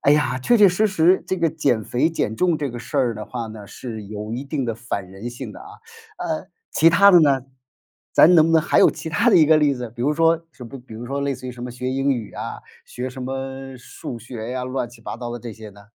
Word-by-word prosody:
哎 140 - +4
呀， 150 -3 +1
确 235 - +3
确 205 -2 +8
实 210 +5 +2
实 185 -1 +3
这 190 - -1
个 170 -1 +2
减 140 -8 0
肥、 125 +10 +1
减 110 -9 -2
重 170 +5 +1
这 145 -2 -2
个 120 - -7
事 125 +6 -7
儿 125 -4 +2
的 105 0 -6
话 120 +1 -5
呢， 110 -2 -10
是 110 0 -7
有 105 +1 -6
一 125 +3 -3
定 140 -1 -2
的 115 -2 -2
反 110 -5 -5
人 100 +6 -7
性 120 - -8
的 - - -12
啊。 - - -11 0.5
呃， - - -3 0.2
其 165 +2 +5
它 200 +4 +7
的 175 -3 +7
呢？ 135 -4 +3 0.7
咱 180 - +7
能 160 -2 +7
不 165 - +1
能 160 - +6
还 - - +2
有 - - +7
其 - - -7
它 230 +9 +2
的 190 - +6
一 155 - +6
个 155 +1 +6
例 150 -2 +3
子？ 125 -3 -5
比 120 +1 -7
如 145 +4 +2
说 165 +1 +2
什 125 - -12
比 135 - -9
比 120 -3 -13
如 120 +2 -7
说 140 +2 -3
类 140 0 0
似 130 -1 -8
于 125 - -5
什 120 0 -10
么 125 - -5
学 125 +1 -5
英 135 +1 0
语 120 -6 -2
啊？ - - -6 0.3
学 125 +1 -5
什 130 0 -8
么 135 0 -5
数 120 0 -8
学 115 -1 -7
呀？ 125 0 -3
乱 130 -1 -3
七 120 -1 -16
八 - - -6
糟 120 0 -6
的 120 - -5
这 115 -1 -8
些 110 0 -11
呢？ 100 0 -15
130 Hz, 295 characters per minute, -22 LUFS, 120-155 Hz, 0.7 s, 确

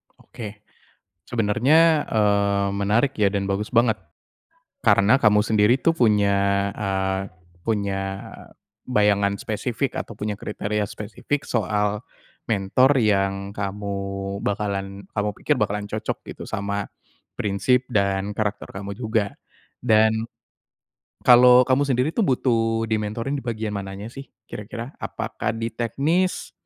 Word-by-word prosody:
Oke. 105 -2 -10 0.6
Sebenernya, 135 +8 +3
eee, 100 -2 +2
menarik 105 +7 +1
ya 100 -2 +3
dan 100 0 -1
bagus 100 +2 -2
banget. 115 -2 +3 0.9
Karena 100 +5 +5
kamu 105 -1 +5
sendiri 110 +3 +4
itu 165 - +3
punya, 100 -4 +2
eee, 95 -1 -1 0.4
punya 100 -3 -1 0.9
bayangan 100 -4 +2
spesifik, 120 +6 -2
atau 115 - -5
punya 105 0 -2
kriteria 105 +1 -3
spesifik 115 +7 -4
soal 105 -1 0 0.5
mentor 115 +7 +3
yang 100 -3 +1
kamu 100 0 -4 0.5
bakalan 100 -1 -3
kamu 105 0 0
pikir 150 - +1
bakalan 105 -3 -1
cocok 110 +1 -3 0.2
gitu - - -9
sama 100 0 -3 0.5
prinsip 125 +6 +1
dan 100 -3 0
karakter 105 -1 -2
kamu 100 +1 -6
juga, 110 -4 -1 0.4
dan 110 -1 +3 1.0
kalau 125 0 +8
kamu 130 +2 +3
sendiri 125 +1 +2
tuh 230 - +3
butuh 115 -5 +1
dimentorin 110 +5 -2
di 135 - -5
bagian 110 -3 -3
mananya 100 +2 -6
sih 135 +1 -9 0.2
kira-kira? 115 +5 -7
Apakah - - -3
di 115 0 -2
teknis 145 - 0
105 Hz, 115 wpm, -23 LUFS, 100-120 Hz, 1.0 s, kalau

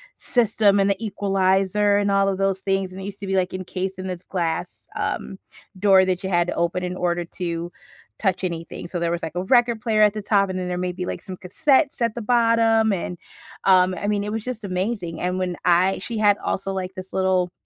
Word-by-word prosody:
system 215 -4 +2
and 195 0 +3
the 200 - +2
equalizer 195 0 +2
and 205 0 +1
all 195 0 +3
of 195 -1 -1
those 195 -1 0
things, 195 -1 -1
and 185 - -9
it 190 - -6
used 200 - -7
to 200 - -6
be, 195 - 0
like, 185 -1 0
encased 185 0 -4
in 185 - -5
this 180 -1 -5
glass, 175 -1 -3
um, 195 - -3 0.4
door 190 -1 +5
that 185 0 -1
you 190 - -2
had 175 -1 +2
to - - -3
open 170 +1 0
in 180 0 -3
order 175 -1 -1
to 170 0 -4 0.5
touch 190 -2 0
anything, 170 -1 -5
so 175 - -4
there 170 0 0
was, 170 0 -2
like, 160 0 -6
a 180 - -1
record 235 +1 +3
player 215 -2 +1
at 210 -1 +5
the 215 - -4
top, 200 -2 +2
and 185 - -3
then 180 -1 -3
there 180 0 -2
may 180 0 -1
be, 180 0 -4
like, - - -5
some 185 -1 -8
cassettes 270 - +1
at 230 -1 +1
the 235 - -5
bottom, 230 -1 +3
and, 180 -2 -3 0.5
um, 185 -1 +5
I 205 - -4
mean, 205 -1 0
it 210 - -4
was 220 -1 -3
just 250 -3 -5
amazing, 185 -3 -3
and 180 +1 -1
when 180 -1 -2
I 180 +2 +3
she 225 +4 -2
had 205 -1 +3
also, 195 0 -2
like, 190 0 -4
this 185 0 -9
little 185 -2 +1
190 Hz, 235 wpm, -23 LUFS, 180-205 Hz, 0.5 s, door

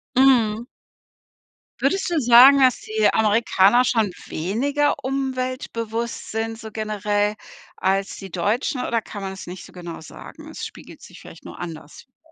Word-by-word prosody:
Mhm. 240 -4 +4 1.1
Würdest 350 +8 0
du 325 - +2
sagen, 250 +3 +8
dass 255 -2 +3
die 215 -1 +1
Amerikaner 220 +1 +4
schon 220 -6 +1 0.2
weniger 275 - 0
umweltbewusst 255 -4 -3
sind, 225 0 -3
so 220 -1 -8
generell, 210 -1 -1 0.4
als 195 +1 -1
die 195 -1 -9
Deutschen? 220 - -1
Oder 230 -1 0
kann 205 -2 -9
man 190 - -4
das 190 - -9
nicht 180 0 -8
so - - -15
genau 175 -2 -8
sagen? 160 - -12
Es - - -6
spiegelt - - -12
sich - - -13
vielleicht - - -14
nur - - -10
anders 160 -4 -9
wider. 255 - -53
225 Hz, 150 wpm, -22 LUFS, 200-255 Hz, 1.1 s, sagen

